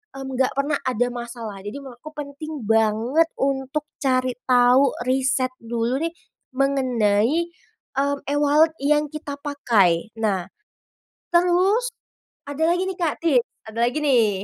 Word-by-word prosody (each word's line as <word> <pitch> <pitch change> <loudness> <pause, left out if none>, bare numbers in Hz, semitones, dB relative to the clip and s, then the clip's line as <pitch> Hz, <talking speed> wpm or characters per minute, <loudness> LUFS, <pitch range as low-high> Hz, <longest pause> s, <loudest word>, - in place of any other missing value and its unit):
mmm, 270 0 -6
enggak 260 -1 +3
pernah 285 +1 +1
ada 245 -1 +1
masalah, 235 -4 -7
jadi 210 +7 -5
memang 265 -3 -10
aku 310 - -8
penting 295 +2 -6
banget 225 +9 +2
untuk 270 +2 -1 0.2
cari 255 -2 +1 0.2
tahu 250 +2 +5 0.2
riset 260 0 +1
dulu 235 +3 -1
nih 335 - -1 0.5
mengenai, 260 +2 +2 0.5
eee, 280 +1 +2 0.2
e-wallet 295 +2 +4
yang 295 +1 +3
kita 295 -2 -5
pakai. 225 - +2
Nah, 195 -5 0 0.9
terus 370 +8 +3 0.6
ada 285 +3 -1
lagi 370 - 0
nih, 380 0 -5
Kak, 330 -4 0
tips, 260 -7 +3 0.3
ada 230 - -8
lagi 260 - -3
nih. 240 -7 +4
270 Hz, 135 wpm, -23 LUFS, 240-295 Hz, 0.9 s, tahu